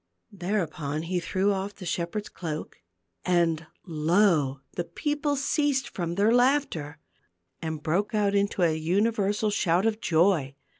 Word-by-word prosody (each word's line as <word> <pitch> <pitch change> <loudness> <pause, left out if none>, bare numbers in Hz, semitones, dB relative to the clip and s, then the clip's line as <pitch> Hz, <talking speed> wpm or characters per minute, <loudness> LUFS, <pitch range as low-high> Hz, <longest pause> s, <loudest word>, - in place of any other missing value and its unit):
Thereupon 170 -6 -2
he 180 +2 -1
threw 190 +4 0
off 195 +1 -4
the 185 - -9
shepherd's 175 +5 -2
cloak, 160 -3 -6 0.4
and 165 -3 +1 0.2
lo! 160 -4 +2
the 175 - -3
people 295 - -1
ceased 280 -1 +1
from 170 -2 -3
their 210 +4 +3
laughter, 245 - +1 0.6
and 160 -2 -4
broke 195 +8 0
out 205 -1 +2
into 200 -2 +1
an 160 -2 +2
universal 205 +4 +1
shout 185 -1 +2
of 225 0 0
joy. 160 -5 +2
185 Hz, 135 wpm, -27 LUFS, 165-210 Hz, 0.6 s, their